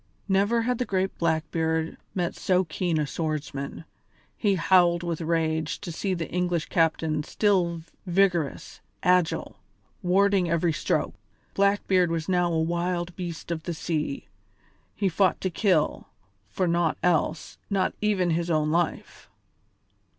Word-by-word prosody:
Never 205 +4 +2
had 245 0 0
the 250 - 0
great 190 -2 -1
Blackbeard 160 0 0 0.2
met 175 -2 -1
so 185 0 +2
keen 170 -1 -1
a 150 - +1
swordsman; 150 0 -4 0.5
he 205 -3 +1
howled 175 -1 +4
with 170 -1 -3
rage 160 -1 0
to 185 -4 -6
see 185 +3 -2
the 165 -2 -3
English 175 -3 -1
captain 160 -2 +1
still 175 -2 +1 0.2
vigorous, 175 -5 0 0.2
agile, 180 -2 +1 0.4
warding 195 -1 +3
every 170 0 +1
stroke. - - -1 0.4
Blackbeard 195 -3 +2
was 165 -1 -2
now 180 -2 +2
a 165 - +1
wild 175 +1 -1
beast 175 -2 -6
of 165 -1 -2
the 170 +1 -4
sea: 155 -3 -3 0.7
he 200 - 0
fought 190 +2 +2
to 185 - -1
kill, 175 -4 +1 0.4
for 180 - -1
naught 170 -1 +1
else, 170 -2 0
not 195 -2 +1
even 195 -5 +1
his 170 +1 0
own 155 -2 +1
life. 170 0 -2
175 Hz, 135 wpm, -26 LUFS, 160-185 Hz, 0.7 s, howled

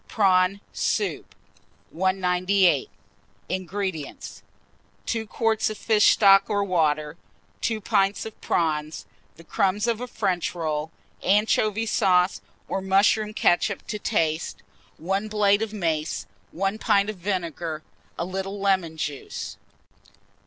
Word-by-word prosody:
PRAWN 195 -1 +2
SOUP. 410 - -2 0.6
198. 185 - +2 0.6
INGREDIENTS. 185 -3 -4 0.6
2 225 -2 -2
quarts 225 0 +1
of 215 - -6
fish 215 -2 +3
stock 195 -1 +5
or 205 -1 +1
water, 155 -4 0 0.4
2 225 -1 0
pints 200 -1 +1
of 220 - -10
prawns, 155 -2 -1 0.3
the 165 - -15
crumbs 195 +4 0
of 235 -1 -1
a 250 - -4
French 180 -7 -1
roll, 155 -2 -2 0.3
anchovy 210 +2 +2
sauce 185 - +2 0.3
or 195 - -2
mushroom 200 +3 +3
ketchup 200 0 +1
to 210 - -4
taste, 165 -6 -1 0.3
1 195 +5 -2
blade 210 -1 +3
of 225 -2 -2
mace, 165 -6 -2 0.3
1 195 +4 -2
pint 200 -3 +3
of 215 -2 -4
vinegar, 170 -4 -3 0.3
a 170 - -2
little 195 +2 -4
lemon 190 -5 +1
juice. 145 -3 -5
195 Hz, 115 wpm, -25 LUFS, 170-210 Hz, 0.6 s, stock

